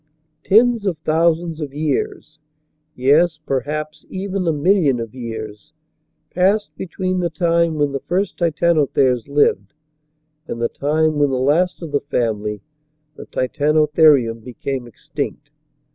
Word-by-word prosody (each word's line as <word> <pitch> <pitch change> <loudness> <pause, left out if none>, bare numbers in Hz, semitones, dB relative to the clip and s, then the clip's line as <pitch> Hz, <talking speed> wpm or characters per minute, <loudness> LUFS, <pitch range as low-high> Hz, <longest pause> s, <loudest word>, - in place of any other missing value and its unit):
Tens 225 +1 +3
of 175 -4 -1
thousands 165 +1 0
of 140 -2 -6
years, 155 0 -3 0.6
yes, 150 +6 +3
perhaps, 150 +3 -3
even 190 -1 -3
a - - +4
million 150 -4 +2
of 115 -2 -6
years, 110 +1 -8 0.6
passed 200 +4 +1
between 185 0 -3
the 175 -1 0
time 170 0 +1
when 145 -2 0
the 135 - -3
first 190 +7 -2
Titanotheres 150 -7 +2
lived 140 -6 +1 0.7
and 115 - -5
the 115 - 0
time 155 +1 0
when 145 -1 +3
the 130 - -1
last 165 +8 +1
of 160 - -7
the 145 - 0
family 105 -6 -2 0.5
the - - -11
Titanotherium 150 -3 +2
became 125 +2 -5
extinct. 120 - -6
150 Hz, 130 wpm, -19 LUFS, 130-170 Hz, 0.7 s, a